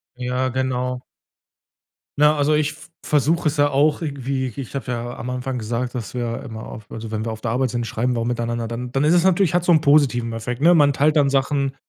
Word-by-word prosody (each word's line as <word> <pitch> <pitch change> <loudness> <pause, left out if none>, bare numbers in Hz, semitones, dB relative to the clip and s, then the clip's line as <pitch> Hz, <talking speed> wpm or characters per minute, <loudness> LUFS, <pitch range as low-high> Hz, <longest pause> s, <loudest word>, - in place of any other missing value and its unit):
Ja, 125 +1 -1
genau. 125 -1 -2 1.2
Na, 150 +1 +5
also 145 +1 +2
ich 150 -1 +1
v 155 0 -15 0.2
versuche 155 +3 +2
es 150 - 0
ja 145 0 +4
auch 145 +3 +2
irgendwie 135 -3 -2
ich 135 -1 -6
habe 135 -2 -3
ja 120 0 -4
am 125 - -5
Anfang 125 +1 -3
gesagt, 120 +2 -3
dass 115 -4 -5
wir 120 -2 -3
immer 110 -1 -8
auf 110 -1 -11
also 115 -1 -7
wenn 110 0 -2
wir 115 - -3
auf 110 - -7
der 115 - -2
Arbeit 130 +2 +1
sind, 120 0 -2
schreiben 125 +2 -1
wir 120 - -1
auch 115 - -1
miteinander. 120 -1 -2
Dann 120 +2 -5
dann 135 +2 0
ist 155 - +4
es 175 -1 +4
natürlich 190 -2 +3
hat 175 -1 +2
so 175 - +3
'n 155 -2 +5
positiven 135 -6 +3
Effekt, 120 +3 -4
ne? 170 +3 +6
Man 145 -3 +5
teilt 150 +3 +2
dann 145 -2 +4
Sachen, 135 0 0
130 Hz, 235 wpm, -21 LUFS, 120-145 Hz, 1.2 s, ne